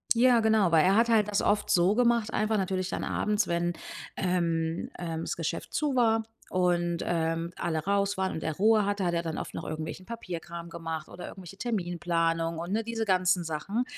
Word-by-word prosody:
Ja, 245 0 +5
genau, 220 -5 +3
weil 160 0 +6
er 195 +2 +4
hat 235 +1 +4
halt 215 -2 +4
das 200 - +1
oft 210 0 +1
so 185 +1 +4
gemacht, 235 -2 +2
einfach 215 0 +1
natürlich 185 -1 -1
dann - - -3
abends, 210 -1 0
wenn, 170 0 0 0.4
ähm, 170 -3 0
ähm, 165 -2 -3
das - - -3
Geschäft 165 -2 -4
zu 295 -3 0
war 225 -2 +3 0.2
und, 175 -2 +1
ähm, 165 0 -1
alle 160 -2 -1
raus 200 +3 0
waren 190 0 0
und 160 - -5
er 160 -2 -2
Ruhe 215 +1 +4
hatte, 200 -1 -1
hat 175 -1 +1
er 170 - 0
dann 165 -1 -4
oft - - -6
noch - - -4
irgendwelchen 160 +4 -5
Papierkram 170 -6 -6
gemacht 165 -2 -5
oder 180 - -8
irgendwelche 190 0 -11
Terminplanung 170 -6 -1
und, 175 +3 -4
ne, 225 +1 +1
diese 225 0 -2
ganzen 185 -2 +2
Sachen, 195 +10 -2
185 Hz, 200 wpm, -28 LUFS, 170-210 Hz, 0.4 s, weil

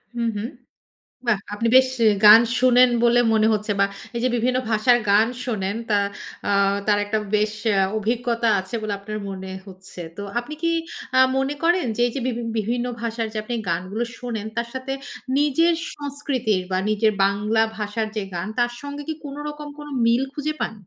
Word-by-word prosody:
হু, 235 - -2
হুম। 215 +5 -3 0.8
বাহ! 215 -4 +3 0.2
আপনি 230 +2 0
বেশ 260 0 +6 0.4
গান 215 +2 +11 0.2
শুনেন 250 0 +6
বলে 240 +1 +5
মনে 220 0 +4
হচ্ছে 210 0 -1
বা - - +6 0.3
এই - - -1
যে, - - +4
বিভিন্ন 250 +2 +1
ভাষার 240 +3 +4
গান 210 +3 +5 0.2
শোনেন, 205 -4 -2
তা 205 - +4 0.5
আ - - +2 0.3
তার 205 -1 +3
একটা 215 +1 -1 0.2
বেশ 210 0 +2 0.2
অ্যা 195 -1 +3 0.2
অভিজ্ঞতা 235 +1 0
আছে 190 +5 -9
বলে 215 -1 -2
আপনার 215 +1 -6
মনে 190 -1 -6 0.2
হচ্ছে। 185 -1 -11 0.2
তো 200 - -5 0.2
আপনি 290 +6 -5
কি 335 - +2 0.5
আ - - +6 0.2
মনে 270 +2 0
করেন 345 0 +3
যে, - - -3
এই 240 - -3
যে, 275 - -2
বিভি 240 -1 -2 0.2
বিভিন্ন 240 +3 -1
ভাষার 230 -1 -2
যে, - - -8
আপনি 240 +3 -4
গানগুলো 185 +7 -1
শোনেন, 230 -4 -4
তার 235 0 -1
সাথে 260 +1 -4 0.5
নিজের 300 +4 +3 0.2
সংস্কৃতির 270 -8 -1
বা 185 - +1
নিজের 215 0 +2
বাংলা 210 +3 +2 0.2
ভাষার 215 +1 -2
যে, 210 - 0
গান, 170 +4 -3
তার 240 0 +2
সঙ্গে 285 0 -6
কি 315 - -1
কোনো 285 0 -7
রকম 295 0 -7
কোনো 295 0 -8 0.2
মিল 235 +3 +3
খুঁজে 305 +1 -2
পান? - - -1
230 Hz, 185 wpm, -23 LUFS, 210-255 Hz, 0.8 s, গান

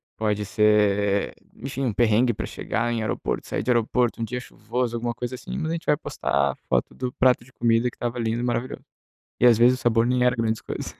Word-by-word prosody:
pode 105 -1 -1
ser, 105 -1 +2 0.2
enfim, 135 +2 -5
um 120 - +1
perrengue 120 +2 +3
para - - -4
chegar 120 0 -2
em 115 - -1
aeroporto, 110 - -3
sair - - -2
de 120 - -4
aeroporto, 120 0 +1
um - - 0
dia 125 +3 -3
chuvoso, 120 0 -3
alguma 120 0 -2
coisa 125 +1 -5
assim. - - -7
Mas 160 -1 -2
a - - -1
gente 170 -1 -5
vai 150 - +3
postar 70 - -1
foto 60 -1 0
do 125 -1 -3
prato 125 -2 +3
de 130 - -20
comida 115 0 +2
que - - -19
estava 120 0 -3
lindo 115 0 -1
e - - -2
maravilhoso. 125 +1 -2 0.6
E, 125 - +4
às 120 -2 +7
vezes, 125 +2 +5
o - - -12
sabor 115 -1 +3
nem 125 0 +2
era 125 0 +3
grandes 115 -2 -1
coisas. - - -6
120 Hz, 230 wpm, -24 LUFS, 110-125 Hz, 0.6 s, às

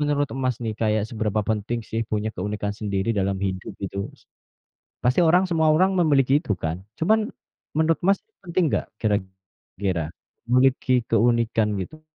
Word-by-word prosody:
menurut 145 -1 +1
Mas 130 -3 0
nih 110 -2 -2
kayak 110 -1 +1
seberapa 110 -2 -1
penting 110 +2 -2
sih 115 - -1
punya 110 0 -1
keunikan 105 +1 -3
sendiri 100 0 -2
dalam 100 -2 0
hidup 95 -1 -3
gitu, 100 0 -3
Mas? - - -19 0.8
Pasti 125 +5 +3
orang 175 +3 +5
semua 160 -3 +2
orang 185 +5 +4
memiliki 145 -7 +3
itu 155 - -3
kan. 80 +3 -3 0.2
Cuman 215 +6 +2 0.5
menurut 160 +1 +2
Mas 195 +2 +4 0.3
penting 175 +1 0
gak - - 0
kira-kira 95 -4 -3 0.4
memiliki 125 -1 +3
keunikan 115 -1 +2
gitu? 155 +12 -7
115 Hz, 150 wpm, -24 LUFS, 100-150 Hz, 0.8 s, orang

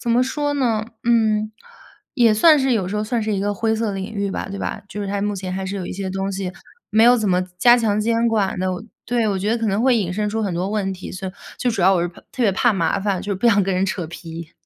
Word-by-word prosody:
怎 235 - -2
么 245 +2 +4
说 290 +2 -1
呢？ 235 -6 +1 0.2
嗯， 220 -2 +2 0.6
也 230 -5 +4
算 305 +7 +6
是 265 -1 +2
有 195 -6 0
时 210 - -3
候 210 - -1
算 230 0 -1
是 215 0 -1
一 200 - 0
个 205 +1 -1
灰 220 +2 0
色 225 0 -1
的 205 - -1
领 195 +3 -5
域 200 -1 -2
吧， - - -4
对 200 - -5
吧？ 210 - -4
就 210 - -6
是 200 - -3
它 200 0 -2
目 205 -1 -1
前 185 -1 -5
还 190 +1 -3
是 190 +1 -4
有 185 -2 -4
一 - - -5
些 190 0 -4
东 195 +1 -2
西 190 -1 -4 0.4
没 220 +2 +5
有 245 +1 +7
怎 215 -3 0
么 180 0 +3 0.2
加 240 +5 +6
强 215 -3 +1
监 230 +2 +1
管 210 -5 0
的 185 0 0
哦 180 - -5 0.2
对， 235 -2 +1
我 195 - 0
觉 200 +3 -2
得 230 - +2
可 225 - -1
能 200 +3 0
会 250 -1 +4
引 185 -5 -1
申 210 +2 -1
出 220 +1 -2
很 195 - -1
多 180 +3 -2
问 200 -2 -1
题， 185 - -8
所 190 0 -5
以 - - -9 0.2
就 245 - 0
主 200 -5 -1
要 190 +1 +5
我 175 - +1
是 175 - -1
怕 170 - -15
特 255 - -2
别 210 - +4
怕 220 +5 +2
麻 170 -2 0
烦， 195 -2 -1
就 205 - -5
是 195 - 0
不 235 - +1
想 205 -3 +5
跟 190 0 0
人 185 +1 +1
扯 185 -2 -2
皮。 165 -1 -9
205 Hz, 330 characters per minute, -21 LUFS, 190-230 Hz, 0.6 s, 有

